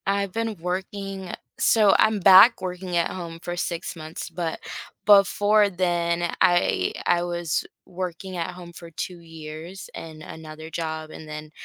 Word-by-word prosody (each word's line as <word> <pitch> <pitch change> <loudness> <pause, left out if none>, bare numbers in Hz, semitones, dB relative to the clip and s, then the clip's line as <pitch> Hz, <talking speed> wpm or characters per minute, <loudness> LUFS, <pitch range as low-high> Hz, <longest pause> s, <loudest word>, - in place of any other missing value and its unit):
I've 200 -1 0
been 225 +1 -2
working 190 +1 -4 0.3
so 215 -3 +5
I'm 215 -1 +4
back 195 +5 +8
working 180 -1 -3
at 170 - +1
home 170 -2 -6
for 175 +1 -5
6 175 0 -3
months. 160 +2 -7
But 165 -1 -3 0.5
before 205 +1 +5
then, 175 -2 0
I 175 - +3
I 175 -1 +3
was 175 -2 -1 0.2
working 185 +1 -5
at 170 +1 -3
home 175 -1 -11
for 170 0 -11
2 175 +2 -6
years 165 +2 -9
and 155 -1 -9
another 155 0 -9
job, 160 -1 -4
and 155 - -10
then 150 0 -7
175 Hz, 150 wpm, -24 LUFS, 165-190 Hz, 0.5 s, back